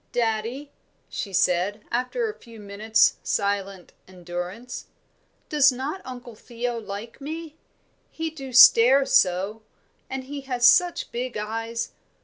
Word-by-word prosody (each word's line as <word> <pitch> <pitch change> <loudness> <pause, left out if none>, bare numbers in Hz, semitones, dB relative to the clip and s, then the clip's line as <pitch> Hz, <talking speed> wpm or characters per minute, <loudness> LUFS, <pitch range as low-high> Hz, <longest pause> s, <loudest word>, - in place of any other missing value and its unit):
"Daddie," 235 +5 -2 0.4
she 200 - -5
said, 190 +3 +1
after 255 - -1
a 430 - -4
few 230 -2 -14
minutes' 210 +2 +2
silent 200 -2 -2
endurance. 180 +6 -7 0.6
"Does 290 -2 +5
not 275 +9 -5
Uncle 245 -2 -9
Theo 235 +2 -5
like 210 +4 -8
me? 315 +2 -6 0.5
He 325 0 -4
do 270 -4 -9
stare 255 +2 +7
so. 195 -1 +2 0.5
And 265 0 -4
he 280 +2 -7
has 250 -3 0
such 355 +7 +4
big 245 0 -4
eyes." 225 +2 -4
235 Hz, 125 wpm, -24 LUFS, 205-270 Hz, 0.6 s, stare